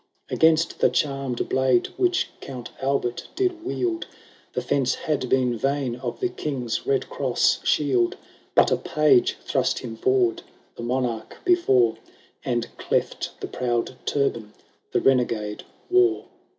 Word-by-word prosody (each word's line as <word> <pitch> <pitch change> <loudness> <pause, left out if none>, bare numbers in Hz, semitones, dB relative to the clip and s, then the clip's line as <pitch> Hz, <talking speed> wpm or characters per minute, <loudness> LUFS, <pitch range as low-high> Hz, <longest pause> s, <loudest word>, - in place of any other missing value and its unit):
Against 160 +1 +3
the - - +5
charmed 135 -4 -1
blade 130 -2 +2
which 360 0 +1
Count 125 -3 -8
Albert 135 -3 -1
did 360 -2 0
wield, 360 -2 -2 0.5
The - - -1
fence 130 -2 +1
had 140 -5 -2
been 125 -2 +2
vain 135 +1 -1
of 125 -1 -5
the 370 - 0
King's 125 - -3
Bed 135 -1 0
cross 130 -3 +1
shield; 130 -5 +2 0.4
But - - +5
a - - +3
Page 150 -5 +3
thrust - - 0
him 115 -2 -6
forward 125 -1 +2 0.3
the - - -8
monarch 120 -2 -2
before, 130 - +4 0.5
And 120 -1 -2
cleft - - -2
the - - -3
proud 120 0 -2
turban 115 -7 -1 0.4
the - - +1
renegade 115 -5 +1 0.3
wore. 370 -1 +4
130 Hz, 135 wpm, -24 LUFS, 120-150 Hz, 0.5 s, the